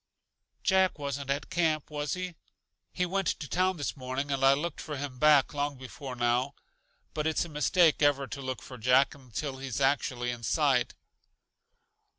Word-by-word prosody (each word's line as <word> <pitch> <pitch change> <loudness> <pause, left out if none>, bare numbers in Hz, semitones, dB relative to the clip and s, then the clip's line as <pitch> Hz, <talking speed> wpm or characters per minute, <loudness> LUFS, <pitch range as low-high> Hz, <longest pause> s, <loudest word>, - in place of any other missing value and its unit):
"Jack 190 -3 +3
wasn't 140 -1 -4
at 140 +1 -2
camp, 155 -3 0
was 145 +1 -2
he? 185 -1 -4 0.6
He 180 - 0
went 190 0 -1
to 150 - -2
town 185 +4 +1
this 145 - -3
morning, 130 +1 -4
and 135 -1 -1
I 135 0 +7
looked 155 +2 -4
for 150 -3 -5
hi 145 +2 -3
back 145 +3 +4
long 145 -1 -2
before 130 0 -8
now. 120 +3 +1 0.6
But 155 0 -1
it's 160 +2 +1
a - - -9
mistake 155 +2 +3
ever 145 -2 +3
to 140 +1 -7
look 130 -1 -5
for 130 -3 -10
Jack 130 +4 +4
until 135 +1 -6
he's 135 -2 -4
actually 135 -3 +1
in 120 -1 -7
sight." 135 +1 +1
140 Hz, 170 wpm, -29 LUFS, 130-155 Hz, 0.6 s, I